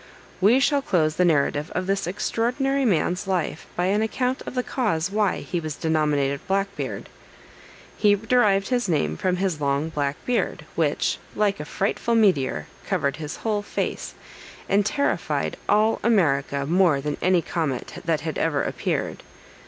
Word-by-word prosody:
We 220 Hz, +7 st, +5 dB
shall 280 Hz, +1 st, +2 dB
close 160 Hz, -, +1 dB
the 180 Hz, -, +4 dB
narrative 150 Hz, -1 st, +1 dB
of 185 Hz, -, -1 dB
this 195 Hz, -2 st, -1 dB
extraordinary 250 Hz, +8 st, 0 dB
man's 180 Hz, -1 st, +1 dB
life 180 Hz, -4 st, -2 dB
by 175 Hz, -, 0 dB
an 200 Hz, +3 st, +2 dB
account 250 Hz, +4 st, -1 dB
of -, -, -6 dB
the 250 Hz, -, 0 dB
cause 195 Hz, -11 st, -1 dB
why 210 Hz, -1 st, +1 dB
he 175 Hz, -, -3 dB
was 155 Hz, -2 st, -5 dB
denominated 150 Hz, -4 st, +1 dB
Black 195 Hz, +1 st, 0 dB
Beard. -, -, -5 dB, 0.9 s
He 205 Hz, -1 st, +5 dB
derived 210 Hz, -1 st, +2 dB
this 245 Hz, -5 st, +1 dB
name 155 Hz, -4 st, +1 dB
from 185 Hz, -1 st, 0 dB
his 180 Hz, -4 st, -1 dB
long 140 Hz, +2 st, 0 dB
black 145 Hz, -2 st, -1 dB
beard, 245 Hz, -1 st, -1 dB
which, -, -, 0 dB, 0.2 s
like 205 Hz, -1 st, +1 dB
a 150 Hz, -, -5 dB
frightful 210 Hz, +7 st, -1 dB
meteor, 140 Hz, -, +2 dB, 0.2 s
covered 140 Hz, +2 st, -1 dB
his 155 Hz, -1 st, -5 dB
whole 210 Hz, -2 st, +1 dB
face, 205 Hz, -, -4 dB, 0.5 s
and 200 Hz, +1 st, +3 dB
terrified 280 Hz, +7 st, -1 dB
all 215 Hz, +2 st, +3 dB
America 140 Hz, -10 st, +2 dB
more 170 Hz, -2 st, +3 dB
than 145 Hz, +1 st, -3 dB
any 180 Hz, -2 st, +3 dB
comet 155 Hz, -7 st, -3 dB
that 160 Hz, -2 st, 0 dB
had 160 Hz, 0 st, -3 dB
ever 145 Hz, -3 st, +1 dB
appeared. -, -, -2 dB
185 Hz, 160 wpm, -24 LUFS, 155-215 Hz, 0.9 s, We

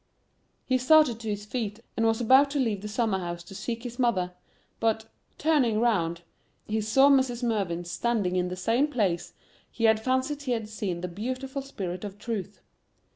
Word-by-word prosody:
He 255 Hz, -1 st, +2 dB
started 255 Hz, -3 st, +5 dB
to 225 Hz, -2 st, -5 dB
his 205 Hz, 0 st, -3 dB
feet, 215 Hz, -2 st, -3 dB, 0.2 s
and 225 Hz, 0 st, +2 dB
was 225 Hz, 0 st, +2 dB
about 265 Hz, +4 st, +6 dB
to 285 Hz, 0 st, -1 dB
leave 220 Hz, -7 st, 0 dB
the 210 Hz, -, -5 dB
summer 215 Hz, -2 st, 0 dB
house 175 Hz, -1 st, -5 dB
to 175 Hz, -, -12 dB
seek 230 Hz, +4 st, -4 dB
his 245 Hz, 0 st, -7 dB
mother, 190 Hz, -8 st, +1 dB, 0.5 s
but, 220 Hz, -1 st, +1 dB, 0.3 s
turning 275 Hz, -9 st, +2 dB
round, 170 Hz, -8 st, +1 dB, 0.4 s
he 220 Hz, +1 st, -1 dB
saw 245 Hz, +6 st, +5 dB
Mrs. 260 Hz, -3 st, +3 dB
Mervyn 195 Hz, -7 st, -1 dB
standing 185 Hz, +1 st, -1 dB
in 180 Hz, 0 st, +1 dB
the 180 Hz, -, -4 dB
same 230 Hz, +9 st, +2 dB
place 195 Hz, -, -1 dB, 0.4 s
he 230 Hz, -, -6 dB
had 220 Hz, -1 st, +5 dB
fancied 260 Hz, +3 st, 0 dB
he 260 Hz, -3 st, -1 dB
had 225 Hz, -2 st, -3 dB
seen 195 Hz, -5 st, -3 dB
the 180 Hz, -, -3 dB
beautiful 255 Hz, +9 st, -4 dB
spirit 190 Hz, -9 st, -5 dB
of 200 Hz, -1 st, -6 dB
Truth. 210 Hz, -2 st, -5 dB
225 Hz, 180 wpm, -27 LUFS, 195-255 Hz, 0.5 s, about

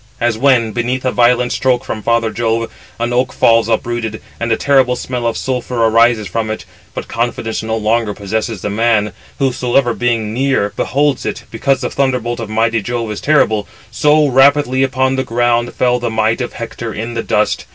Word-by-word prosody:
As 120 Hz, -1 st, +1 dB
when, 120 Hz, -2 st, +3 dB
beneath 125 Hz, +3 st, -2 dB
a 130 Hz, -, +2 dB
violent 125 Hz, 0 st, +2 dB
stroke 130 Hz, -2 st, 0 dB
from 110 Hz, -, -4 dB
father 115 Hz, 0 st, +1 dB
Jove, 115 Hz, 0 st, -1 dB, 0.3 s
an 120 Hz, +1 st, -1 dB
oak 125 Hz, +1 st, +1 dB
falls 115 Hz, -1 st, +3 dB
uprooted, 115 Hz, -1 st, -2 dB, 0.2 s
and 115 Hz, 0 st, -2 dB
a 110 Hz, -, +2 dB
terrible 135 Hz, -3 st, +3 dB
smell 125 Hz, -1 st, -3 dB
of 115 Hz, -, -1 dB
sulphur 125 Hz, -1 st, -3 dB
arises 115 Hz, -1 st, +3 dB
from 115 Hz, -1 st, -2 dB
it; 110 Hz, -, -5 dB, 0.3 s
but -, -, -5 dB
confidence 115 Hz, -1 st, -2 dB
no 110 Hz, 0 st, -2 dB
longer 110 Hz, -1 st, 0 dB
possesses 110 Hz, 0 st, -3 dB
the 105 Hz, -, -2 dB
man, 105 Hz, -1 st, +1 dB, 0.2 s
whosoever 125 Hz, -2 st, +1 dB
being 115 Hz, -3 st, -1 dB
near 130 Hz, -5 st, 0 dB
beholds 140 Hz, 0 st, 0 dB
it, -, -, -4 dB
because 130 Hz, +3 st, 0 dB
the 125 Hz, -, -3 dB
thunderbolt 125 Hz, -3 st, -1 dB
of 115 Hz, -2 st, -5 dB
mighty 115 Hz, +1 st, +1 dB
Jove 115 Hz, 0 st, -3 dB
is 105 Hz, -, -5 dB
terrible: 110 Hz, -9 st, +2 dB, 0.2 s
so 150 Hz, +5 st, +3 dB
rapidly 135 Hz, 0 st, +3 dB
upon 130 Hz, 0 st, +1 dB
the 130 Hz, -, 0 dB
ground 120 Hz, 0 st, 0 dB
fell 125 Hz, -1 st, +2 dB
the 120 Hz, -1 st, -2 dB
might 110 Hz, +2 st, 0 dB
of 125 Hz, -, -4 dB
Hector 115 Hz, 0 st, -6 dB
in 115 Hz, +3 st, -5 dB
the 115 Hz, -, -2 dB
dust. 105 Hz, -1 st, 0 dB
120 Hz, 185 wpm, -16 LUFS, 110-125 Hz, 0.3 s, when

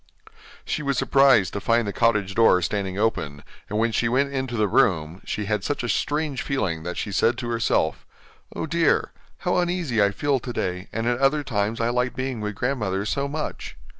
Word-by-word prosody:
She -, -, -2 dB
was 140 Hz, -2 st, -1 dB
surprised 135 Hz, -9 st, +4 dB
to 100 Hz, -, -3 dB
find 115 Hz, +1 st, +2 dB
the 100 Hz, -, -3 dB
cottage 105 Hz, -5 st, +1 dB
door 110 Hz, -4 st, +5 dB
standing 95 Hz, 0 st, -2 dB
open, 75 Hz, -10 st, -1 dB, 0.3 s
and 105 Hz, -, -2 dB
when 115 Hz, +1 st, +2 dB
she 115 Hz, +1 st, +1 dB
went 140 Hz, +3 st, +1 dB
into 130 Hz, -3 st, -2 dB
the 105 Hz, -1 st, +2 dB
room, 85 Hz, -1 st, +1 dB
she 105 Hz, -, -3 dB
had 105 Hz, -1 st, -1 dB
such 145 Hz, +1 st, -2 dB
a -, -, -2 dB
strange 150 Hz, -1 st, -1 dB
feeling 95 Hz, -12 st, -1 dB
that 90 Hz, +2 st, -5 dB
she 100 Hz, -, -3 dB
said 115 Hz, +4 st, +2 dB
to 120 Hz, -2 st, -4 dB
herself: 115 Hz, -9 st, 0 dB, 0.5 s
'Oh -, -, -2 dB
dear! 165 Hz, +1 st, +1 dB, 0.3 s
how 180 Hz, -, +2 dB
uneasy 175 Hz, -, 0 dB
I 100 Hz, -, +4 dB
feel 135 Hz, +7 st, 0 dB
today, 90 Hz, -7 st, -4 dB
and 115 Hz, 0 st, -3 dB
at 120 Hz, 0 st, +1 dB
other 140 Hz, +2 st, +2 dB
times 110 Hz, -3 st, -1 dB
I 115 Hz, 0 st, +1 dB
like 125 Hz, +1 st, 0 dB
being 130 Hz, -3 st, -3 dB
with 105 Hz, -1 st, -3 dB
grandmother 105 Hz, -6 st, -1 dB
so 140 Hz, +6 st, -1 dB
much. 150 Hz, +2 st, -5 dB
115 Hz, 195 wpm, -24 LUFS, 100-135 Hz, 0.5 s, door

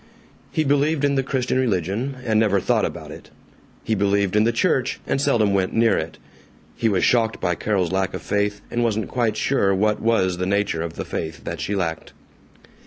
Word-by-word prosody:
He 155 Hz, -, +1 dB
believed 145 Hz, +1 st, +1 dB
in 140 Hz, -, +2 dB
the 135 Hz, -, +2 dB
Christian 130 Hz, -1 st, -1 dB
religion, 115 Hz, +3 st, -1 dB
and 110 Hz, -2 st, +2 dB
never 100 Hz, -3 st, +3 dB
thought -, -, +1 dB
about -, -, -6 dB
it, -, -, -11 dB, 0.5 s
he 110 Hz, -, -1 dB
believed 100 Hz, -1 st, +1 dB
in 105 Hz, +1 st, +4 dB
the 115 Hz, -, +3 dB
church, 120 Hz, +2 st, 0 dB
and 135 Hz, -, 0 dB
seldom 115 Hz, -8 st, +2 dB
went 95 Hz, -1 st, 0 dB
near 115 Hz, 0 st, +3 dB
it; 80 Hz, 0 st, -4 dB, 0.6 s
he 115 Hz, -, +1 dB
was 95 Hz, -3 st, +1 dB
shocked 115 Hz, -3 st, +2 dB
by 90 Hz, -1 st, 0 dB
Carol's 95 Hz, -1 st, -1 dB
lack 95 Hz, 0 st, -1 dB
of -, -, -7 dB
faith, 105 Hz, 0 st, -1 dB
and 120 Hz, -, 0 dB
wasn't 110 Hz, -3 st, -1 dB
quite 115 Hz, -4 st, 0 dB
sure 100 Hz, -8 st, +2 dB
what 105 Hz, +2 st, +1 dB
was 95 Hz, -6 st, +1 dB
the 90 Hz, -, -1 dB
nature 100 Hz, -4 st, 0 dB
of 85 Hz, -1 st, -4 dB
the -, -, -5 dB
faith 80 Hz, 0 st, -5 dB
that 85 Hz, -1 st, -5 dB
she 105 Hz, -, -2 dB
lacked. 80 Hz, -4 st, -3 dB
105 Hz, 200 wpm, -22 LUFS, 95-120 Hz, 0.6 s, in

